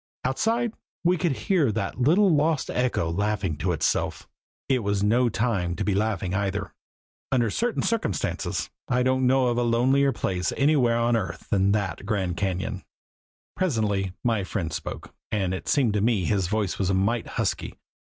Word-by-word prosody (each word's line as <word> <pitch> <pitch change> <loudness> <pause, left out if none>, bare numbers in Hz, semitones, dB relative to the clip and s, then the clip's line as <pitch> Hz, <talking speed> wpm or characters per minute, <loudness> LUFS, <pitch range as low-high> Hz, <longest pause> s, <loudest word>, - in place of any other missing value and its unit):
Outside 225 - 0 0.3
we 180 +1 +4
could 170 -3 0
hear 165 - +2
that 105 +3 -3
little 175 +8 +4
lost 150 0 +1
echo 125 -10 0
laughing 100 -2 -1
to 90 +4 -1
itself. 80 - -1 0.4
It 130 -2 +2
was 100 -2 -1
no 120 +4 +3
time 100 -6 -1
to - - -2
be 105 - +1
laughing 100 -3 -1
either. 100 0 -2 0.6
Under 120 -5 +2
certain 240 - -1
circumstances 225 - -1 0.2
I 125 0 +2
don't 130 0 +2
know 130 -1 +3
of 120 0 0
a - - +2
lonelier 130 +4 +3
place 90 -8 -1
anywhere 135 -5 +3
on 120 0 +2
earth 95 -6 -4
than 100 0 +3
that 95 -6 -2
Grand 95 -4 -1
Cañon. 95 +1 -2 0.7
Presently 105 - 0
my 115 -4 +1
friend 90 -4 -3
spoke, - - -6 0.2
and 95 -4 0
it 95 - -5
seemed 130 -7 +2
to 105 - +1
me 110 -4 +2
his 95 -3 +1
voice 105 -3 -1
was 95 -2 +1
a 95 - +2
mite 110 +5 0
husky. - - -1
110 Hz, 170 wpm, -25 LUFS, 95-130 Hz, 0.7 s, we